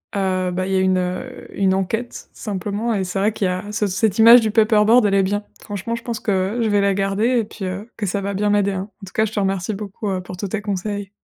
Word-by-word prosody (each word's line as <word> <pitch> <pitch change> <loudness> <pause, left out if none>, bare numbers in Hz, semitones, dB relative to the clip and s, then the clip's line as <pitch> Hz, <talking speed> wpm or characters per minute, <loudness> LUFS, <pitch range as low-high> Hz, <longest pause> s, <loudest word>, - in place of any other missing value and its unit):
heu, 185 -2 0
bah, 185 +1 -2
il 195 - -2
y - - +2
a - - +3
une 185 0 0 0.3
une 190 -1 +2
enquête, 220 +6 -3
simplement 205 +3 -3
et 195 -3 0
c'est 185 +1 -3
vrai 205 +3 +2
qu'il 200 - -1
y - - 0
a 185 +3 -4
ce 210 -1 0
cette 200 +1 0
image 230 +2 +9
du 220 -1 0
paperboard, 220 +1 +4
elle 200 - +2
est 195 -1 +4
bien. 205 +2 -1 0.2
Franchement, 205 +2 -4
je 235 - -8
pense 230 -2 -4
que 200 +2 -1
je 225 - +1
vais 205 -1 +3
la 200 0 +2
garder 195 +3 0
et - - +1
puis 205 -1 -8
heu, 190 +5 -5
que 215 - -2
ça 200 +2 -1
va 200 +1 -3
bien 205 +2 0
m'aider, 205 -1 +2
hein. 190 +2 -4
En - - -6
tout 195 - -13
cas, 220 - +2
je 215 - -5
te - - -1
remercie 195 +1 -1
beaucoup, 205 0 -5
heu, 185 -1 -2
pour 180 0 -8
tous 200 - -3
tes 210 +2 -3
conseils. 205 0 -3
200 Hz, 280 wpm, -20 LUFS, 190-215 Hz, 0.3 s, image